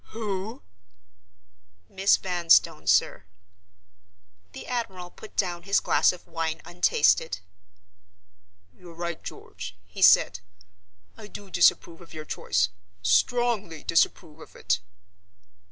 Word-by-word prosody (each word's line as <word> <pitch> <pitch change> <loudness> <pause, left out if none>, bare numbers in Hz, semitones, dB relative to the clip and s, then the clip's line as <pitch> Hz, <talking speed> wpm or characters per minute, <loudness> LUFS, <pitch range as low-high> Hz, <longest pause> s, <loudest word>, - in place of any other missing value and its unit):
"Who!!!" 215 0 -5 1.2
"Miss 195 +1 +3
Vanstone, 175 -3 +2
sir." - - +2 1.3
The - - -9
admiral 190 -8 -4
put 215 - -13
down 175 -3 -1
his 200 0 +2
glass - - +3
of 180 - -12
wine 165 -1 -3
untasted. 160 - +2 1.4
"You're 175 -2 -15
right, 170 -1 -5
George," - - -9
he - - -10
said. 95 - +6 0.8
"I 215 - -10
do 205 -2 -11
disapprove 170 -1 +2
of 170 - -14
your 155 0 -7
choice 90 -10 0 0.3
—strongly 195 - +1
disapprove 160 -1 0
of - - -14
it." 90 -1 0
175 Hz, 105 wpm, -26 LUFS, 160-200 Hz, 1.4 s, said